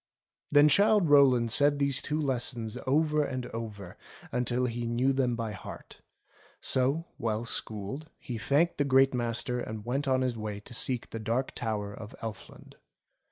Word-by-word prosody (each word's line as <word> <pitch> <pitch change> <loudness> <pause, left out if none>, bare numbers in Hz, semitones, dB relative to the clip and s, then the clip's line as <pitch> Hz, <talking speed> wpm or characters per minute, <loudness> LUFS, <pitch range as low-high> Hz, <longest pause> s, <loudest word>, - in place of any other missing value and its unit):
Then 145 0 +6
Childe 200 +1 +4
Rowland 130 -5 +5
said 145 +4 +5
these 140 -2 +2
two 155 +1 -2
lessons 125 -5 -2
over 150 +2 +2
and 130 -3 -4
over 105 -5 -7 0.3
until 125 +1 0
he 120 -1 -3
knew 125 +4 +1
them 130 -3 +1
by 115 -2 -3
heart; 95 - -10 0.6
so, 135 +6 0
well 110 0 -1
schooled, 115 +7 -4
he 120 -3 -6
thanked 150 +9 +1
the - - +4
Great 135 -1 +4
Master 120 0 -1
and 110 -3 -6
went 135 +4 -2
on 130 -1 +2
his 125 -2 0
way 105 -1 -4
to 115 - -12
seek 125 0 -1
the 115 - -5
Dark 115 +4 -1
Tower 105 -3 -3
of 110 +1 -10
Elfland. 110 -2 -9
125 Hz, 160 wpm, -29 LUFS, 115-140 Hz, 0.6 s, Then